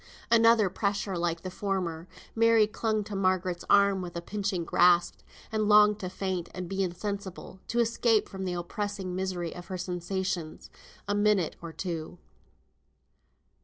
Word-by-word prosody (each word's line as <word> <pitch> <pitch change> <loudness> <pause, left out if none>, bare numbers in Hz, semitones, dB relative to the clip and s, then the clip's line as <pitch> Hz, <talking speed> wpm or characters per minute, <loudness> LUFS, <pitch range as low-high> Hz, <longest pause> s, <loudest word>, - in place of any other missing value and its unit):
Another 230 -2 +6
pressure 200 0 -2
like 170 -1 -1
the 185 - -6
former! 180 -4 -3 0.3
Mary 230 -1 +5
clung 215 0 -1
to 205 0 -7
Margaret's 185 -2 0
arm 200 -1 +5
with 175 -1 -7
a - - -2
pinching 195 -2 -2
grasp, 175 0 +3 0.3
and 215 -1 0
longed 210 0 +6
to 185 - -4
faint, 185 -2 -3
and 180 -1 -5
be 195 +2 -2
insensible, 190 0 -5
to 235 - -3
escape 230 -1 +2
from 190 0 -7
the 180 -1 -2
oppressing 190 +2 -4
misery 185 -3 -3
of 175 0 -10
her 185 - -4
sensations. 180 -2 -4 0.4
A 205 - 0
minute 205 -5 +2
or 170 -1 -7
two. 170 -1 -5
190 Hz, 150 wpm, -28 LUFS, 175-210 Hz, 0.4 s, Another